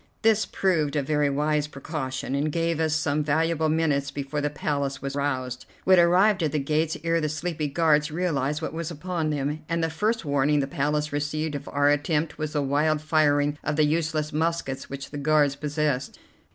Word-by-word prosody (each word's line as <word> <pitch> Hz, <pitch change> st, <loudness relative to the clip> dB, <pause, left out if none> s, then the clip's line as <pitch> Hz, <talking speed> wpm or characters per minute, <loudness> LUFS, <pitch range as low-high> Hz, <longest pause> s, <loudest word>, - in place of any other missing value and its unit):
This 220 Hz, -1 st, +3 dB
proved 160 Hz, -6 st, 0 dB
a 145 Hz, -, +1 dB
very 150 Hz, 0 st, +1 dB
wise 150 Hz, +1 st, 0 dB
precaution, 135 Hz, -3 st, -5 dB
and 145 Hz, +2 st, 0 dB
gave 165 Hz, 0 st, 0 dB
us 160 Hz, -1 st, +1 dB
some 150 Hz, -1 st, 0 dB
valuable 160 Hz, +1 st, +1 dB
minutes 150 Hz, -3 st, +1 dB
before 140 Hz, +1 st, -4 dB
the 145 Hz, -, 0 dB
Palace 140 Hz, -1 st, -2 dB
was 135 Hz, 0 st, -5 dB
roused. 130 Hz, -3 st, -2 dB, 0.2 s
We 190 Hz, -, +2 dB
had 175 Hz, -, +6 dB
arrived 190 Hz, +3 st, +4 dB
at 155 Hz, -3 st, +1 dB
the -, -, +1 dB
gates 155 Hz, +3 st, 0 dB
ere 165 Hz, 0 st, +1 dB
the 155 Hz, -, 0 dB
sleepy 155 Hz, 0 st, -2 dB
guards 150 Hz, 0 st, +2 dB
realized 150 Hz, -3 st, -1 dB
what -, -, -3 dB
was 165 Hz, -1 st, -4 dB
upon 170 Hz, 0 st, -3 dB
them, 150 Hz, +1 st, -2 dB
and 165 Hz, 0 st, 0 dB
the 165 Hz, -, 0 dB
first 215 Hz, +5 st, -1 dB
warning 145 Hz, +1 st, +2 dB
the 140 Hz, -, +1 dB
Palace 150 Hz, +2 st, -1 dB
received 150 Hz, +1 st, -2 dB
of 140 Hz, 0 st, -6 dB
our 145 Hz, 0 st, +3 dB
attempt 150 Hz, +2 st, 0 dB
was 155 Hz, 0 st, -3 dB
the 145 Hz, -2 st, 0 dB
wild 150 Hz, +3 st, +1 dB
firing 150 Hz, -1 st, +2 dB
of 150 Hz, -, -1 dB
the 155 Hz, 0 st, +4 dB
useless 155 Hz, -1 st, -1 dB
muskets 160 Hz, -3 st, -2 dB
which 140 Hz, 0 st, -7 dB
the 145 Hz, -, -5 dB
guards 145 Hz, -1 st, +3 dB
possessed. 145 Hz, -2 st, -2 dB
150 Hz, 195 wpm, -25 LUFS, 145-160 Hz, 0.2 s, had